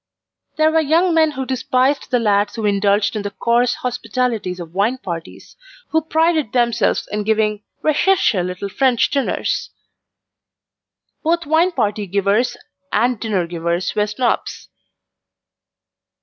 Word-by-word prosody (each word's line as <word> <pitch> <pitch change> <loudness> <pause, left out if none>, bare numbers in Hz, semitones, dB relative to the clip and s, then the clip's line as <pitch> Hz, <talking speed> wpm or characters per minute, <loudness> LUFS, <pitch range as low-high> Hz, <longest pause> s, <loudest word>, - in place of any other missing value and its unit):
There 310 0 +4
were 320 - +3
young 330 +4 +2
men 320 -1 +4
who 265 -2 -4
despised 260 +2 0
the 250 - +2
lads 205 -3 +1
who 225 -2 -3
indulged 200 +1 +2
in 210 - -2
the 205 - -4
coarse 235 +4 +1
hospitalities 230 -5 -2
of 170 -1 -9
wine 210 +7 +1
parties, 170 -7 -8 0.3
who 320 - +2
prided 320 -5 +1
themselves 235 -3 +1
in 210 +1 -1
giving 215 0 0 0.2
RECHERCHE 310 - +2
little 180 +2 -4
French 250 +3 +1
dinners. 280 -2 -1 1.5
Both 335 +1 0
wine 320 +5 +3
party 210 -6 -1
givers 200 +6 +1 0.3
and 240 +2 +1
dinner 205 -6 -1
givers 170 +1 -2
were 210 0 +1
Snobs. 235 +4 -2
230 Hz, 130 wpm, -19 LUFS, 200-275 Hz, 1.5 s, There